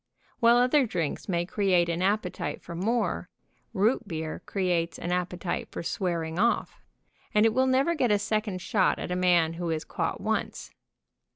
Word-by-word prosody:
While 235 0 +6
other 255 +2 +4
drinks 175 -3 -3
may 175 -1 0
create 185 -3 +2
an 170 0 -1
appe 195 0 +1
tite - - -5
for 170 - -8
more, 225 +8 -1 0.4
root 225 +2 +1
beer 160 -3 -4
creates 175 -4 0
an 175 - -4
appetite 180 0 -2
for - - -6
swear 170 -2 -1
ing 160 +2 -5
off, 235 +3 0 0.5
and 210 +1 +5
it 225 - +3
will 260 +2 +3
never 270 +6 +3
get 255 -7 +1
a 210 - +4
second 205 -2 -2
shot 195 -4 +2
at - - -5
a - - 0
man 175 -3 +3
who 170 0 -4
is 160 -1 -1
caught - - -3
once. - - -3
185 Hz, 180 wpm, -27 LUFS, 170-220 Hz, 0.5 s, While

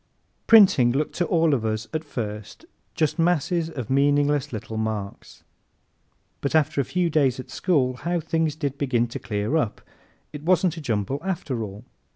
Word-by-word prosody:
Printing 190 - +7
looked 145 +3 -1
to 175 - 0
all 165 -3 +3
of 125 -5 0
us 110 0 -2
at 155 0 -2
first 105 - -6 0.3
just 155 +1 0
masses 170 0 +1
of 130 -7 -6
meaningless 145 0 +2
little 110 -1 -6
marks. 110 -2 -5 1.0
But 140 - -1
after 145 -2 +2
a - - -4
few 180 +4 0
days 135 -4 +2
at 130 - -9
school 130 -9 +1
how 175 +5 -1
things 160 -1 -1
did 140 -3 -4
begin 125 -4 +1
to - - -6
clear 105 +5 -2
up! 115 -10 -1 0.5
It 150 - -7
wasn't 180 +1 +2
a - - -5
jumble 115 0 -2
after 160 -10 -3
all. 105 +2 -7
140 Hz, 170 wpm, -24 LUFS, 115-160 Hz, 1.0 s, Printing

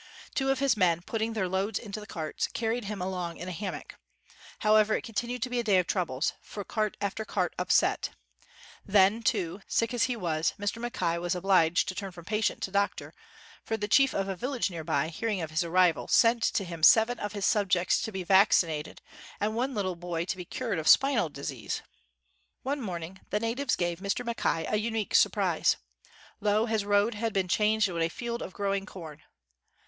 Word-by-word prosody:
Two 270 -1 0
of 270 - +2
his 270 -3 +2
men, 175 -4 +2
putting 225 +3 -2
their 205 -4 -1
loads 195 +3 -1
into 215 -2 -6
the 210 - -10
carts, 160 -5 -3
carried 230 0 -1
him 200 -2 -4
along 180 -2 -4
in 175 - -7
a - - -4
hammock. 190 +2 -6 0.6
However, 215 0 +4
it - - -3
continued 240 +1 -3
to 255 - -2
be 245 - 0
a - - 0
day 205 -4 +3
of 180 - +2
troubles; 160 -7 -1
for 205 - -7
cart 215 +1 -2
after 200 +2 -2
cart - - -1
upset, - - +2 0.7
Then 200 +2 +4
too, 195 -5 -1
sick 230 +1 0
as 240 - +2
he 250 - -1
was, 165 -6 -1
Mr. 205 +3 -3
Mackay 180 -9 -1
was 175 +1 -1
obliged 180 -2 +3
to - - -2
turn 195 0 -5
from 170 -2 -12
patient 210 +2 -1
to 190 - -3
doctor; 200 0 -1 0.5
for 225 - -2
the 210 -1 -3
chief 270 +5 +4
of 195 0 0
a 195 - -2
village 250 +1 -2
near 165 -2 -6
by, 150 +1 0
hearing 210 +4 -2
of 160 -2 -4
his 160 +3 +1
arrival, 170 -1 +2
sent 230 0 +4
to 200 - +1
him 170 -3 -7
seven 225 +8 +6
of 205 0 -4
his 205 -2 -2
subjects 190 -4 +2
to 220 - -3
be 190 -2 -4
vaccinated 170 -5 +3 0.4
and 210 +1 0
one 255 +2 -1
little 190 -3 -1
boy 170 -1 -3
to 185 - -2
be 180 -1 -8
cured 225 -3 -3
of 155 - -4
spinal 275 +1 +5
disease!, - - -5 0.8
One 280 +1 -2
morning 180 -3 -6
the 210 - 0
natives 245 +5 0
gave 175 -1 -2
Mr. 200 +5 -2
Mack 235 0 -4
ay 165 -1 0
a 215 - +1
unique 220 -1 -2
surprise. - - +3 0.6
Lo, 210 +1 +2
his 220 -3 -1
road 205 +2 +3
had 225 +1 -2
been 190 -2 0
changed 215 +3 +2
into 170 -3 -3
a 165 - +2
field 235 +6 -5
of - - -6
growing 200 0 -2
corn. 160 -6 -10
200 Hz, 205 wpm, -28 LUFS, 180-225 Hz, 0.8 s, seven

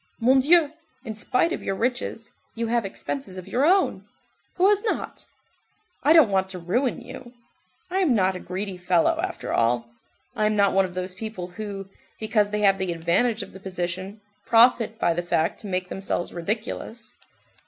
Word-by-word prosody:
Mon 255 +3 +5
Dieu, 305 +2 +5 0.3
in 220 - -4
spite 250 +10 +1
of - - -4
your 195 - -2
riches, 235 0 -2 0.2
you 230 0 -2
have 230 -1 0
expenses 195 0 -5
of 185 0 -8
your 245 +7 0
own—who 375 +1 0
has 410 0 +3
not? 445 - -3 0.7
I 290 - +3
don't 315 -10 +7
want 190 -1 +1
to 190 - -6
ruin 235 +10 -1
you, 240 -1 -11 0.6
I 380 - +1
am 320 -10 +3
not 190 -2 +2
a - - -5
greedy 185 +1 -4
fellow, 180 - +2
after 375 - -4
all. 120 0 +1 0.4
I 215 - +2
am 215 - 0
not 200 -1 +3
one 195 0 +4
of 180 -1 -9
those 185 0 -4
people 190 -3 -6
who, 195 0 -6 0.3
because 215 -1 +1
they 210 0 -2
have 195 -1 +4
the 190 -2 -1
advantage 180 +7 +1
of - - -11
the 190 - -10
position, 185 +2 -5 0.2
profit 230 -1 +4
by 170 - +2
the 175 - -1
fact 170 -2 0
to 210 - -8
make 185 -1 -2
themselves 190 -2 -3
ridiculous. 220 +4 -4
205 Hz, 180 wpm, -24 LUFS, 185-240 Hz, 0.7 s, don't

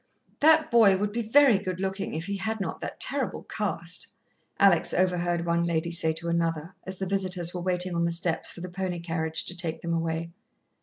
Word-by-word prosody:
"That 315 +1 +5
boy 215 -5 +6
would 205 +1 -1
be 235 +3 -2
very 235 -1 +5
good 185 -2 -4
looking 195 -1 -3
if 160 +2 -3
he 200 0 -3
had 220 +3 -3
not 195 - -4
that - - -6
terrible - - -2
cast," - - -1 0.5
Alex 190 -4 +4
overheard 175 -2 +1
one 170 0 +1
lady 170 0 -1
say 165 -1 +3
to 165 +2 -5
another, 165 0 -1
as 190 0 -6
the 190 - -3
visitors 185 -3 0
were 180 - -4
waiting 180 0 0
on 170 0 +1
the - - +1
steps 170 0 -1
for 175 - -8
the 180 - -6
pony 180 -1 -3
carriage 160 -1 -3
to 180 - -4
take 170 -2 -3
them 170 0 -2
away. 165 0 -2
175 Hz, 205 wpm, -27 LUFS, 170-195 Hz, 0.5 s, boy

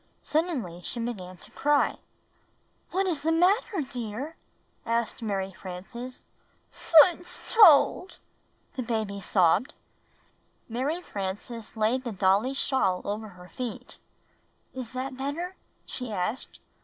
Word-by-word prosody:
Suddenly 285 - -1
she 240 - -4
began 190 -6 -5
to - - -13
cry. 290 0 +3
"Wliy, - - -16 0.9
what 385 +2 0
is 340 -6 0
the 320 +2 +1
matter, 370 +3 +3
dear?" 255 +2 -5 0.5
asked 230 +1 -1
Mary 195 -3 -2
Frances. 195 +8 -8 0.8
'Toots 355 0 -3
told," 375 -2 +6 0.6
the 260 - -2
baby 220 -4 -2
sobbed. 185 - +2 0.9
Mary 275 +9 -2
Frances 210 - -6
laid 225 +4 +1
the 240 - -3
dolly's 200 +7 +2
shawl 190 -12 +1
over 215 +2 -3
her 180 -3 -13
feet. 250 -3 -6 0.7
"Is 255 -3 -6
that 260 +1 -4
better?" 315 +7 -3 0.3
she 250 -3 -5
asked. 210 +6 -3
240 Hz, 120 wpm, -27 LUFS, 200-290 Hz, 0.9 s, told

